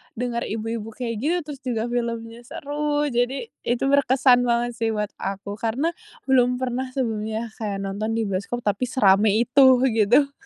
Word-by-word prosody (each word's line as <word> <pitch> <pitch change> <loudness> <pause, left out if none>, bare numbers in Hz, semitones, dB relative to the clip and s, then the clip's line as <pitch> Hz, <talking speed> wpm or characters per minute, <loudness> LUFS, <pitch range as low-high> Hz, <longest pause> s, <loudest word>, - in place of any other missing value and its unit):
denger 240 0 -2
ibu-ibu 225 0 -4
kayak 230 0 -4
gitu, 340 +4 +2
terus 290 -2 -8
juga 235 -2 -2
filmnya 235 -1 -3
seru. 295 +2 -2
Jadi, 245 - -1 0.2
itu 240 +1 0
berkesan 260 -2 +4
banget 240 0 0
sih 225 0 0
buat 210 -1 -2
aku. 200 +1 -4
Karena, 250 +9 0 0.4
belum 250 -1 +3
pernah 255 +1 -2
sebelumnya 220 -2 -2
kayak 200 -3 -3
nonton 205 +3 -3
di 225 - +1
bioskop 200 +5 -3
tapi 205 +4 0
serame 205 -3 +4
itu 245 +5 +4 0.3
gitu. 240 +6 +3
235 Hz, 155 wpm, -23 LUFS, 220-255 Hz, 0.4 s, berkesan